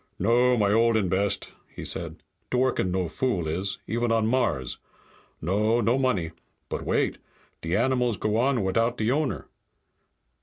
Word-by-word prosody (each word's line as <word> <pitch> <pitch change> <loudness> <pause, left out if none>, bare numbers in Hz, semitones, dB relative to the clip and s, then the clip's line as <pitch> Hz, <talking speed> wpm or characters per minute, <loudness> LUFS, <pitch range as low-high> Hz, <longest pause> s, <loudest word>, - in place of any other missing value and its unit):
"No, 125 +1 +3
my 100 -2 +2
old 115 0 +4
and 95 -5 0
best," 100 +2 0
he - - -9
said. - - -5 0.3
"Dworken 125 -6 +1
no 90 -1 0
fool 95 -6 -1
is, 95 +5 -1
even 120 +1 -1
on 115 -1 +2
Mars. 115 - 0 0.6
No, 105 +5 +1
no 120 +1 +2
money. 100 -12 0 0.4
But - - -3
wait! - - 0 0.4
De 85 +2 -1
animals 125 -2 +1
go 105 +2 -1
on 125 -2 +2
without 115 +6 +1
the 110 +2 +1
owner. 150 +1 -1
115 Hz, 150 wpm, -26 LUFS, 95-125 Hz, 0.6 s, old